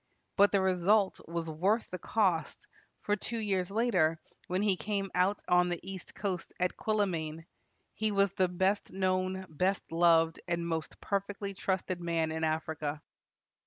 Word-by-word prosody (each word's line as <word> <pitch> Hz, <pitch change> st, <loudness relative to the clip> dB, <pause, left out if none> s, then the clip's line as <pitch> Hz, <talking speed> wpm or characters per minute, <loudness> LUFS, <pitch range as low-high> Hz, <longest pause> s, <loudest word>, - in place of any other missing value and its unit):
But 200 Hz, 0 st, +5 dB
the 200 Hz, -, +3 dB
result 190 Hz, +2 st, +2 dB
was 170 Hz, 0 st, -3 dB
worth 190 Hz, +9 st, +1 dB
the 185 Hz, -, -4 dB
cost; 180 Hz, -7 st, 0 dB, 0.4 s
for 205 Hz, -, +1 dB
two 230 Hz, +3 st, -4 dB
years 195 Hz, -4 st, 0 dB
later, 190 Hz, -8 st, +2 dB, 0.3 s
when 185 Hz, +3 st, 0 dB
he 200 Hz, -3 st, +3 dB
came 195 Hz, +3 st, -2 dB
out 185 Hz, +3 st, +1 dB
on 180 Hz, 0 st, +4 dB
the 175 Hz, -1 st, -2 dB
east 190 Hz, -2 st, -8 dB
coast 190 Hz, -4 st, -3 dB
at 180 Hz, 0 st, +1 dB
Quilimane, 165 Hz, -7 st, -1 dB, 0.5 s
"he 215 Hz, 0 st, 0 dB
was 200 Hz, -1 st, +2 dB
the 185 Hz, -, +2 dB
best 190 Hz, +3 st, 0 dB
known, 185 Hz, 0 st, 0 dB
best 185 Hz, +5 st, -1 dB
loved, 165 Hz, -1 st, +4 dB
and 170 Hz, -1 st, -1 dB
most 160 Hz, -1 st, -3 dB
perfectly 200 Hz, 0 st, -2 dB
trusted 185 Hz, -2 st, -2 dB
man 165 Hz, -2 st, 0 dB
in 160 Hz, 0 st, -3 dB
Africa." 155 Hz, -1 st, -2 dB
185 Hz, 155 wpm, -31 LUFS, 165-200 Hz, 0.5 s, But